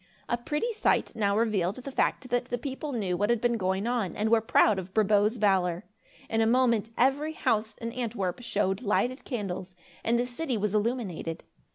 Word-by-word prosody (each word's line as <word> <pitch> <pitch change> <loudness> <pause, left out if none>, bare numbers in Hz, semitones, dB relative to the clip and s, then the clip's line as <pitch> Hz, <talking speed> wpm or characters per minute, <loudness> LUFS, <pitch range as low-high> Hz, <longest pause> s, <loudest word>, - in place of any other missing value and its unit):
A - - +1
pretty 295 - -2
sight 435 - +1
now 200 -2 +1
revealed 205 -4 +1
the 260 +2 -7
fact 255 -1 0
that 245 0 +1
the 245 0 -3
people 275 +3 -5
knew 200 -8 -1
what 205 +4 0
had 235 -1 +3
been 240 +1 +1
going 190 -1 -1
on 235 -7 -1
and 215 +1 0
were 230 -1 +5
proud 215 -2 +4
of 185 0 -9
Brabo's 210 +1 +3
valor. 185 -4 +1 0.4
In 225 0 +1
a 220 - +3
moment, 235 -3 +3
every 285 +5 +2
house 220 -7 0
in 230 0 -5
Antwerp 230 -5 -3
showed 200 -4 0
lighted 250 +4 0
candles, 190 -6 -4 0.3
and 235 +1 +2
the 240 - +1
city 250 0 -3
was 210 -1 -1
illuminated. 210 -7 -2
225 Hz, 190 wpm, -28 LUFS, 200-245 Hz, 0.4 s, were